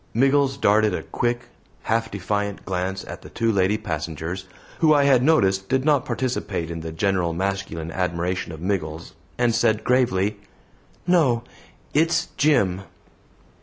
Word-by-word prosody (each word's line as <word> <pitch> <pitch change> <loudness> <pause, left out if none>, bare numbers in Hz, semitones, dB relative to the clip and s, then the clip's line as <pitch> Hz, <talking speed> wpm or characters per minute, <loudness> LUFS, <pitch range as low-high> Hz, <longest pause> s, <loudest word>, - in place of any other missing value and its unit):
Miggles 135 +2 +3
darted 105 -5 +3
a - - -4
quick, 120 0 -1 0.4
half 115 0 0
defiant 100 +1 -3
glance 95 +1 -3
at - - -8
the - - -12
two 115 0 0
lady 100 +1 +2
passengers 85 -1 -4 0.3
who 155 -2 +5
I 145 - +4
had 135 -3 +5
noticed 95 -10 +2
did 130 +1 +1
not 145 -4 +3
participate 115 -9 -2
in 85 - -4
the 80 0 -6
general 90 0 0
masculine 95 -3 -3
admiration 90 0 -2
of 80 -1 -9
Miggles, 85 -4 -3 0.2
and 120 -1 +2
said 110 -1 +2
gravely, 105 -5 +2 0.7
"No; 150 -10 +3 0.5
it's 160 +2 +2
Jim." 100 -11 +2
100 Hz, 140 wpm, -23 LUFS, 90-125 Hz, 0.7 s, who